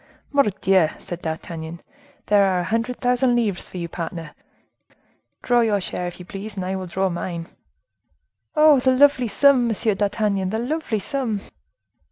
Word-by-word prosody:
"Mordioux!" 195 - +3
said 175 0 -8
D'Artagnan, 160 0 -6 0.5
"there 205 -1 +4
are 190 -2 +2
a - - -3
hundred 230 +5 -2
thousand 245 0 +2
livres 215 -6 -1
for - - -9
you, 170 -1 -3
partner. 165 -1 -6 1.1
Draw 245 -1 +3
your 215 -3 +2
share, 180 -1 -3
if 175 - -7
you 180 - -9
please, 200 +3 -7
and 190 -2 -4
I 190 +1 -2
will 185 -1 -5
draw 190 +2 0
mine." 170 -1 -4 1.1
"Oh! 305 -2 +6
the 260 0 +3
lovely 280 -2 +4
sum! 260 +2 +4
Monsieur 220 -1 +1
d'Artagnan, 200 -1 0
the 220 - -2
lovely 250 0 -2
sum!" 225 -1 -2
205 Hz, 160 wpm, -22 LUFS, 180-245 Hz, 1.1 s, Oh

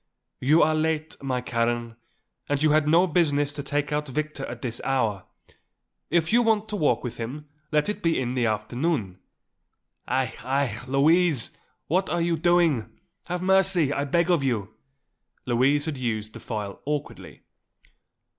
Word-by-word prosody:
"You 150 +6 +4
are 155 - +3
late, 155 0 -1
my 130 -2 -1
Karen, 115 -1 -1 0.5
and 145 +1 0
you 155 - +4
had 155 0 +3
no 170 +4 +5
business 145 -4 +1
to 145 - -5
take 145 0 -2
out 150 0 -1
Victor 150 +1 -3
at 120 0 -8
this 120 -2 -4
hour. 110 -8 0 0.8
If 165 +2 +1
you 240 - +6
want 220 -2 +2
to 210 - -3
walk 155 -7 +1
with 125 - -5
him 135 +6 -6 0.2
let 150 -1 +2
it 210 - -3
be 165 -1 +1
in 125 -1 -2
the 125 -2 +1
afternoon. 110 - -2 0.9
Aïe! 130 -2 0
aïe! 130 -3 -2
Louise! 150 +1 +3 0.3
what 185 +4 0
are 175 - 0
you 170 0 +1
doing? 160 -9 +1 0.3
Have 180 0 -3
mercy 190 -6 +3
I 140 - -1
beg 170 +5 +2
of 170 -4 +3
you!" 110 -6 -1 0.7
Louise 135 +4 +2
had 155 -4 -3
used 110 -4 -3
the - - -9
file 105 -3 -5
awkwardly. 145 0 -5
145 Hz, 160 wpm, -25 LUFS, 125-165 Hz, 0.9 s, you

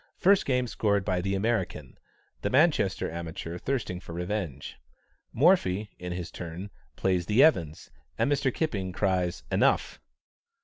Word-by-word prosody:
First 195 +1 +4
game 125 -2 +2
scored 100 -4 0
by 90 -3 0
the 95 +2 -1
American, 95 - -2 0.5
the - - -1
Manchester - - +2
amateur 85 +1 -6
thirsting 120 -9 -2
for 85 - -10
revenge. 90 -5 -4 0.5
Morphy, 110 - +3
in 90 0 -5
his 90 -1 -5
turn, 90 +3 -7 0.2
plays 90 -3 0
the 110 +6 +5
Evans', 85 - +2 0.3
and - - +1
Mr. 140 -2 +2
Kipping 100 - -2
cries 90 -6 0
"enough." - - +1
95 Hz, 135 wpm, -28 LUFS, 85-115 Hz, 0.5 s, the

